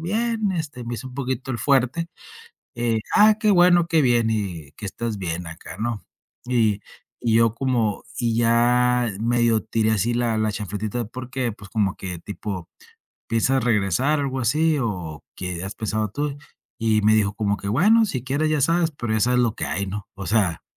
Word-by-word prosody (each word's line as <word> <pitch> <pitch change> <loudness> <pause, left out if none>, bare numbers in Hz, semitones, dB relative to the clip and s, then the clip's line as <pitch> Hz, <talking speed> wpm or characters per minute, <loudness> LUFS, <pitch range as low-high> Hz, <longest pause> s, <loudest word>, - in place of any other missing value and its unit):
bien, 220 +3 0
este, 145 -8 -4
me 120 - -4
hice 130 - -7
un 125 - -12
poquito 130 -1 -3
el 120 - -2
fuerte. 135 +5 +2 0.7
Eh, 115 -2 0 0.2
ah, 215 0 +7
qué 210 -1 +3
bueno, 175 -2 +5
qué 165 -2 +3
bien. 120 -3 +3
Y 90 -9 -3
que 105 - -7
estés 110 +2 -4
bien 85 -2 -4
acá, 80 +1 -9
¿no? 115 -2 -2 0.4
Y 110 -5 +2 0.4
y 115 -2 +1
yo 115 -1 +4
como 120 -5 0
y 115 -2 0
ya 120 0 +3
medio 115 -1 +2
tiré 110 0 +1
así 110 +2 +1
la 120 -2 0
la 110 -1 +1
chanfletita, 105 +3 -3
¿por 130 +2 -8
qué? 125 -4 -1
Pues, 100 -1 -13
como 100 -3 0
que 90 -3 -6
tipo: 95 -1 -6 0.6
"¿Piensas 120 +3 +2
regresar?", 120 - +2
algo 135 -1 -2
así, 150 +6 +2
o 120 -4 0
o: 85 -7 -6
"¿Qué 90 -1 -4
has 95 - -6
pensado 110 -1 -2
tú?" 145 +3 -3 0.4
Y 110 -2 +2
me 110 +1 +5
dijo 105 -1 +2
como 100 -1 0
que: 100 - -5
"Bueno, 215 - +4
si 130 - -4
quieres, 145 +4 0
ya 155 -2 +1
sabes, 165 +2 +2
pero 120 -6 -3
ya 110 - +1
sabes 125 +2 +3
lo 115 -3 +1
que 80 - -3
hay", 85 +7 -2
¿no? 105 +2 -6
O 100 0 -7
sea, 95 -7 +1
115 Hz, 195 wpm, -23 LUFS, 105-130 Hz, 0.7 s, ah